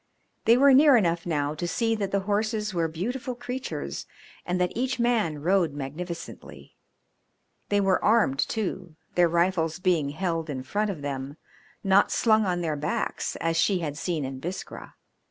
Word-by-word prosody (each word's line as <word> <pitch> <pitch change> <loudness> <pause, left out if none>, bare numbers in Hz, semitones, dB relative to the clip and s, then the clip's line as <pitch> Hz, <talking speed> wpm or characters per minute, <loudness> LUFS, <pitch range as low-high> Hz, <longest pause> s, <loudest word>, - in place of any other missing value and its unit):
They 230 +1 +6
were 275 +1 +6
near 280 -1 +7
enough 170 -5 0
now 145 -3 0
to 165 +3 -4
see 225 +5 0
that 205 -3 -2
the 200 0 0
horses 210 +1 -1
were 170 -2 +1
beautiful 245 - -4
creatures 250 +2 -5 0.4
and 180 0 0
that 180 -1 +1
each 255 +2 -2
man 215 -12 +1
rode 175 -3 +2
magnificently. 155 +5 -7 0.9
They 205 - +3
were 195 -2 +2
armed 210 -12 +3
too, 185 -6 -2 0.2
their 175 -1 +4
rifles 170 -1 +1
being 175 -6 +1
held 165 0 -2
in 130 -3 -4
front 205 +10 -1
of 165 -8 -5
them, 140 +1 -4 0.5
not 195 0 +4
slung 220 -3 +3
on 175 -1 0
their 160 -3 -1
backs 150 +1 -2
as 165 0 -1
she 190 +3 +3
had 150 -3 -3
seen 160 -2 -2
in 130 0 -6
Biskra. 175 +7 -7
180 Hz, 165 wpm, -26 LUFS, 160-215 Hz, 0.9 s, near